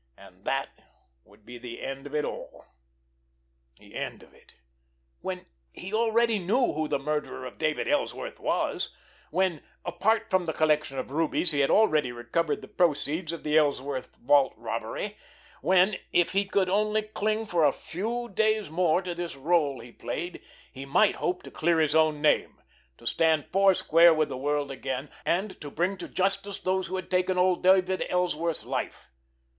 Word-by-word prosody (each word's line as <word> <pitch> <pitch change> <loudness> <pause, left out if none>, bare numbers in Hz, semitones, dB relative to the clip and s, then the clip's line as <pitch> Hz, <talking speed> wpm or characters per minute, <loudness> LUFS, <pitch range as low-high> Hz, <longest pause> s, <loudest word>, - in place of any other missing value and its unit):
And - - -17
that - - -1 0.5
would 105 +1 -22
be 120 0 -10
the 120 -1 -8
end 135 +1 -5
of 145 - -7
it 150 - +1
all! - - -8 1.1
The - - -18
end - - -5
of - - -20
it—when 65 - -11 0.3
he 195 +3 -8
already 230 0 +2
knew 220 +8 +1
who 155 +1 -1
the - - 0
murderer 150 -2 -3
of - - -9
David 155 -1 0
Ellsworth - - -2
was; - - -1 0.4
when, 185 -5 0 0.2
apart 185 +6 0
from 185 -2 +2
the 160 - -1
collection 150 -3 +1
of 130 - -4
rubies, 165 +3 +1
he 145 - 0
had 140 - +3
already 155 - +3
recovered 120 +7 -2
the - - -9
proceeds 160 0 0
of 170 - -7
the 150 0 0
Ellsworth 140 -3 -2
vault 140 +1 +3
robbery; - - -4 0.4
when, 190 +1 +4
if 175 -1 +3
he 195 +1 +1
could 195 -1 +1
only 215 +3 +1
cling 215 +1 -1
for 175 -6 +1
a 145 - +6
few 220 - -4
days 215 -3 +1
more 175 +1 +2
to 175 -1 -3
this 170 -2 -5
rôle 145 -3 +1
he 120 - -12
played, 165 +11 -5 0.3
he 135 - -8
might 150 +10 +3
hope 180 0 -2
to - - -10
clear 170 -1 +1
his 155 -2 +2
own 155 -1 +3
name, 150 - +2 0.4
to - - -17
stand 160 +3 +2
foursquare 175 -3 +5
with 155 -1 +1
the - - -4
world 145 +1 -1
again, 135 +1 -4 0.2
and 190 +4 -1
to 145 - -6
bring 175 +7 0
to - - -7
justice 195 +1 -1
those 185 0 -1
who 190 - -4
had 185 -1 -5
taken 185 0 +1
old 180 0 +3
David 185 0 +3
Ellsworth's 170 -2 0
life. - - -4
170 Hz, 170 wpm, -27 LUFS, 145-190 Hz, 1.1 s, a